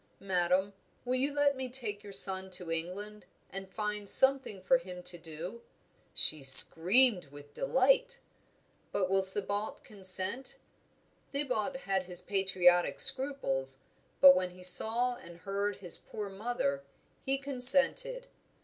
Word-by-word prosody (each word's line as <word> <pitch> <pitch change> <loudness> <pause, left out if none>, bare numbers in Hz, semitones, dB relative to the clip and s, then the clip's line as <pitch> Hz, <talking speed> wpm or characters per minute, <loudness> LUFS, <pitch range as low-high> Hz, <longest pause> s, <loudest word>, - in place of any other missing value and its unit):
'Madame, 190 +1 -2 0.3
will 250 - -3
you 265 +3 0
let 285 -1 -1
me 260 -1 -7
take 230 -5 -1
your 205 - -12
son 190 -1 +2
to 180 -2 -8
England, 195 +6 -7 0.3
and 195 0 -10
find 210 -1 -5
something 265 -6 +4
for 255 +8 0
him 180 -6 -12
to 175 - -2
do?' 170 +7 -11 0.5
She 155 - -1
screamed 180 - +6
with 145 +1 -17
delight. 270 - -1 0.7
'But 185 -1 -3
will 195 0 +1
Thibaut 200 +2 -7
consent?' 195 +5 -1 0.7
Thibaut 270 -3 -4
had 190 -4 -4
his 180 -1 -6
patriotic 185 -3 -1
scruples; 135 - 0 0.4
but 185 0 +7
when 185 0 -3
he 180 0 -17
saw 235 +6 +3
and 170 0 -15
heard 200 +1 -5
his 180 -3 +2
poor 210 -2 -9
mother, 195 - -5 0.4
he 270 0 -3
consented. 275 - +3
200 Hz, 130 wpm, -29 LUFS, 180-255 Hz, 0.7 s, but